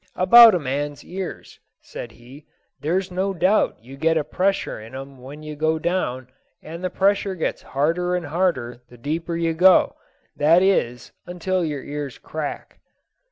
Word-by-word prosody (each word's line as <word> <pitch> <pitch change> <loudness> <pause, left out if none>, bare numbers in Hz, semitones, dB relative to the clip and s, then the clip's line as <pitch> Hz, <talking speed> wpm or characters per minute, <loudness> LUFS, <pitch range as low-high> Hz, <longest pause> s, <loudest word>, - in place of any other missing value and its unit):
"About 225 +3 +8
a - - +1
man's 145 +1 -4
ears," 185 0 -7 0.2
said 115 - -9
he; 130 +6 -15 0.3
"there's 185 +4 -1
no 190 +2 -1
doubt 185 +5 +2
you 135 +3 -12
get 160 +2 +2
a 155 - +1
pressure 185 - -1
in 115 +4 -11
'em 135 0 -9
when 145 +4 -10
you 155 0 -7
go 155 +2 0
down, 155 -7 -2 0.4
and 165 +3 -8
the 185 - -1
pressure 195 +1 +1
gets 160 - -3
harder 170 +6 -1
and 180 -2 -3
harder 145 -7 -1
the 120 - -15
deeper 160 +7 -3
you 165 -1 0
go, 180 +3 +5 0.4
that 165 +5 +4
is, 125 -12 0 0.2
until 180 +1 -2
your 150 -4 -3
ears 145 -3 -6
crack." 155 -2 -6
160 Hz, 160 wpm, -22 LUFS, 140-180 Hz, 0.4 s, About